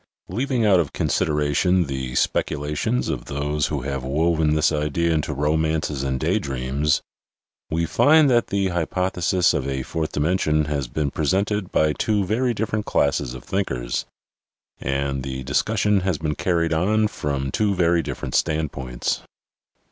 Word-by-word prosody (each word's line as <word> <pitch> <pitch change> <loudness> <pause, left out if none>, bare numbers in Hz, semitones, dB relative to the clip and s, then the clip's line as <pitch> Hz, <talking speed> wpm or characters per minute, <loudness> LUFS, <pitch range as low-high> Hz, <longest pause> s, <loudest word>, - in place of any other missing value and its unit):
Leaving 120 +4 0
out 95 -4 +5
of 80 -5 -1
consideration 75 +5 +1
the 65 -2 -4
speculations 75 - 0
of 75 -7 -3
those 75 +1 -1
who 75 -3 -2
have 70 -1 -3
woven 80 +2 +1
this 75 - +3
idea 75 +2 0
into 75 -1 -1
romances 75 0 0
and 65 -1 -1
day 90 +9 +1
dreams 70 0 -1 0.7
we 85 +1 0
find 150 - +5
that 120 -3 +3
the 100 -1 0
hypothesis 90 +1 +1
of 70 -3 -1
a 65 -1 -2
fourth 80 +3 -3
dimension 75 -1 +1
has 70 -3 -2
been 70 +2 -2
presented 95 +5 0
by 75 -1 +2
two 105 +1 0
very 120 +6 +1
different 110 -1 -2
classes 65 -3 +1
of 60 - -9
thinkers, 65 -12 -2 0.7
and 70 0 -1
the 65 0 -5
discussion 105 - +1
has 95 -3 -1
been 75 -1 -2
carried 85 -1 0
on 105 +7 +2
from 70 -7 -3
two 105 +3 +1
very 85 -1 +3
different 65 - -5
standpoints. 70 -6 -1
80 Hz, 150 wpm, -23 LUFS, 70-95 Hz, 0.7 s, out